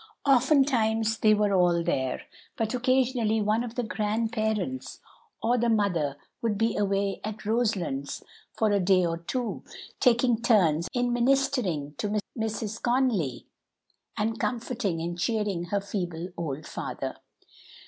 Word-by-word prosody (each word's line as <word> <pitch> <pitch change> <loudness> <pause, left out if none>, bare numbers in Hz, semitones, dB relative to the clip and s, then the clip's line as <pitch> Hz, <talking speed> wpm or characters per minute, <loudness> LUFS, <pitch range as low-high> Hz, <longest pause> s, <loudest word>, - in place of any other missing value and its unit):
Oftentimes 245 -5 +3
they 215 -1 +5
were 205 -1 +2
all 175 -2 +3
there, 130 -6 -1 0.3
but 225 0 -1
occasionally 250 -3 +2
one 215 +2 +1
of 240 -1 -7
the 245 - -1
grandparents 220 +3 -2 0.4
or 240 +2 +2
the 235 +1 +2
mother 175 -10 +1 0.2
would 225 -3 0
be 225 +1 +1
away 200 -1 0
at 215 0 -6
Roselands 200 - -1 0.3
for 220 -2 +1
a 200 - +3
day 185 -1 +4
or 165 0 -2
two, 240 +8 -3 0.4
taking 240 -2 +3
turns 180 -9 +3
in 245 -1 0
ministering 240 - +1
to 210 0 0 0.2
Mrs. 220 -1 -3
Conly, 240 - +1 0.7
and 225 +2 -1
comforting 230 -7 -2
and 170 +1 -4
cheering 205 -3 0
her 200 +4 0
feeble 180 -4 -4
old 155 -3 -4
father. - - -5
215 Hz, 130 wpm, -27 LUFS, 180-240 Hz, 0.7 s, they